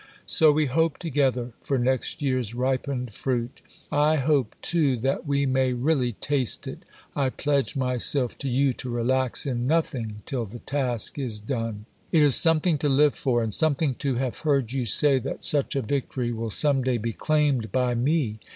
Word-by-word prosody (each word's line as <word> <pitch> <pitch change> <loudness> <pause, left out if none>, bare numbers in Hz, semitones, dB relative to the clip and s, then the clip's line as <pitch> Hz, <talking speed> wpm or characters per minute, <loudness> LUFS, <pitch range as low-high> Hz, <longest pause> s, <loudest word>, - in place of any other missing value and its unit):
So 155 -2 +4
we 155 +1 +2
hope 160 +3 +1
together 130 -6 0
for 135 - -1
next 130 +3 -1
year's 130 -5 -1
ripened 130 -1 -2
fruit. 125 +1 -3 0.3
I 150 +1 +3
hope, 140 -5 +1
too, 150 -7 +1
that 135 +5 -2
we 140 0 +1
may 130 -1 +1
really 125 -1 0
taste 135 +1 -2
it. - - -8 0.3
I 135 -2 +1
pledge 140 +1 -1
myself 125 0 +1
to 140 - -3
you 135 +1 +2
to 130 - -6
relax 125 +3 0
in 125 -3 -2
nothing 120 -9 -1
till 125 -4 -3
the 110 +4 -9
task 130 -1 -3
is 120 -6 -3
done. 110 -2 -4 0.3
It 160 -3 +5
is 145 -3 +6
something 165 -1 +3
to 145 - 0
live 145 +1 +4
for, 120 -4 0
and 110 -2 -3
something 155 0 +1
to 135 -3 0
have 125 0 -2
heard 140 -7 0
you 130 -3 -2
say 140 +4 +4
that 130 - -5
such 145 -6 +1
a 135 - 0
victory 125 0 -2
will 115 0 -4
some 140 +4 +2
day 125 -1 0
be 115 +1 -3
claimed 145 -8 0
by 125 +1 +1
me. 120 -3 0
130 Hz, 180 wpm, -25 LUFS, 120-145 Hz, 0.3 s, is